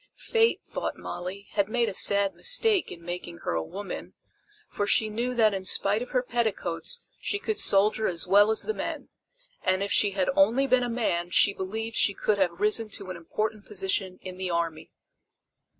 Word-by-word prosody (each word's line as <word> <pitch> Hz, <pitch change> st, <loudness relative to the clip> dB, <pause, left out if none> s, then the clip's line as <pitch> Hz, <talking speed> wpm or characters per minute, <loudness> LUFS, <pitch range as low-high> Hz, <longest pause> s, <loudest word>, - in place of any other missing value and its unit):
Fate, 455 Hz, 0 st, +1 dB
thought -, -, -4 dB
Molly, 185 Hz, +3 st, -6 dB
had 200 Hz, -1 st, +1 dB
made 240 Hz, 0 st, +1 dB
a -, -, -3 dB
sad 200 Hz, +1 st, +3 dB
mistake, 450 Hz, -6 st, +1 dB
in 170 Hz, -, -10 dB
making 175 Hz, -, -6 dB
her -, -, -1 dB
a 80 Hz, -, 0 dB
woman, 195 Hz, -, -7 dB, 0.5 s
for 205 Hz, -, -3 dB
she 220 Hz, 0 st, +3 dB
knew 245 Hz, +3 st, -2 dB
that 220 Hz, -3 st, +4 dB
in 190 Hz, -1 st, -3 dB
spite 200 Hz, +3 st, +1 dB
of 245 Hz, -, -5 dB
her 250 Hz, -1 st, 0 dB
petticoats 225 Hz, -, -2 dB, 0.2 s
she 405 Hz, -, -1 dB
could 425 Hz, +1 st, -2 dB
soldier 210 Hz, +2 st, +4 dB
as 170 Hz, -2 st, -2 dB
well 200 Hz, +3 st, +5 dB
as 220 Hz, -, +2 dB
the 435 Hz, -, -1 dB
men, -, -, -5 dB, 0.5 s
and 185 Hz, +1 st, +1 dB
if 200 Hz, -, -3 dB
she 205 Hz, -, +4 dB
had 190 Hz, -2 st, +1 dB
only 275 Hz, -2 st, +4 dB
been 255 Hz, -2 st, +3 dB
a 245 Hz, -, -1 dB
man 195 Hz, -7 st, -1 dB
she 200 Hz, +2 st, +4 dB
believed 220 Hz, +5 st, -4 dB
she 200 Hz, -, +2 dB
could 210 Hz, -2 st, 0 dB
have 175 Hz, -3 st, 0 dB
risen 215 Hz, +1 st, +2 dB
to 185 Hz, -2 st, -7 dB
an -, -, -6 dB
important 210 Hz, +5 st, -3 dB
position 190 Hz, -2 st, -2 dB
in 185 Hz, -1 st, -7 dB
the 185 Hz, -1 st, -3 dB
army. 165 Hz, -2 st, -2 dB
205 Hz, 195 wpm, -27 LUFS, 185-230 Hz, 0.5 s, well